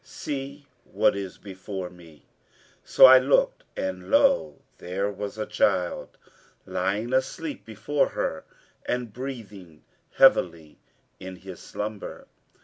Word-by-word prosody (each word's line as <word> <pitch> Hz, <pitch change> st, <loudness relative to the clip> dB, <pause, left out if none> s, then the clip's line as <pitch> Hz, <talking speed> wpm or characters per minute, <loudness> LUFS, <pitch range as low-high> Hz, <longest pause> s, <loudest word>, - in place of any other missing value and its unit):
See 140 Hz, 0 st, -6 dB, 0.2 s
what 130 Hz, -, +1 dB
is 95 Hz, -2 st, -6 dB
before 95 Hz, -1 st, -7 dB
me.' 85 Hz, -4 st, -17 dB, 0.6 s
So -, -, +7 dB
I 130 Hz, 0 st, +10 dB
looked 135 Hz, +2 st, +2 dB
and 95 Hz, -1 st, -4 dB
lo! 75 Hz, -2 st, +3 dB, 0.2 s
there 100 Hz, +3 st, -2 dB
was 100 Hz, +1 st, -6 dB
a 110 Hz, -, -2 dB
child 90 Hz, -1 st, 0 dB, 0.5 s
lying 110 Hz, +6 st, -2 dB
asleep 140 Hz, +4 st, -2 dB
before 125 Hz, +7 st, -1 dB
her 80 Hz, -, -3 dB, 0.4 s
and 125 Hz, -3 st, -2 dB
breathing 105 Hz, -, -8 dB, 0.3 s
heavily 85 Hz, -, +3 dB, 0.4 s
in 95 Hz, 0 st, -8 dB
his 95 Hz, 0 st, -11 dB
slumber. 105 Hz, 0 st, -6 dB
100 Hz, 115 wpm, -26 LUFS, 90-130 Hz, 0.6 s, I